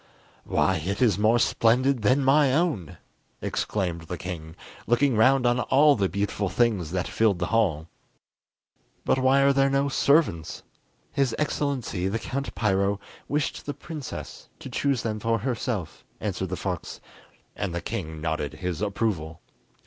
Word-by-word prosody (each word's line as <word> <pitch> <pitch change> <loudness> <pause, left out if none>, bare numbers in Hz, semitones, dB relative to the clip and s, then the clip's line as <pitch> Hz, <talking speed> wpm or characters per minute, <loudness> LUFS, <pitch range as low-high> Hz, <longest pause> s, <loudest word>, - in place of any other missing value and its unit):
"Why 95 -2 +2
it 95 +6 -3
is 110 -7 +3
more 110 +3 +4
splendid 125 +3 +2
than 130 +7 +3
my 140 0 +5
own!" 150 - -1 0.4
exclaimed 85 -5 -2
the 90 - -4
king, 85 -3 -7 0.3
looking 120 +2 +3
round 130 +4 +4
on 120 +1 +3
all 145 +4 +4
the 100 -3 0
beautiful 100 0 -1
things 105 -9 +1
that 90 +1 -2
filled 110 -4 +2
the 90 - -1
hall. 85 -9 +1 1.2
But - - +2
why 130 +1 +4
are 140 0 +5
there 135 0 +3
no 140 +1 +1
servants?" 140 - +1 0.5
"His 135 -5 0
Excellency 140 -11 -1
the 100 +4 -1
Count 135 +5 -4
Piro 100 -2 +1 0.3
wished 150 0 -2
the 145 - -3
princess 155 -5 -8
to 130 - -9
choose 135 +1 0
them 110 -2 -2
for 115 +1 +1
herself," 115 - -3 0.2
answered 95 -3 -3
the 90 - -2
fox, 90 -4 -4 0.6
and 100 - -3
the 85 - -2
king 80 -2 -5
nodded 80 -2 -2
his 90 +2 -4
approval. 95 -6 -2
110 Hz, 150 wpm, -26 LUFS, 90-135 Hz, 1.2 s, my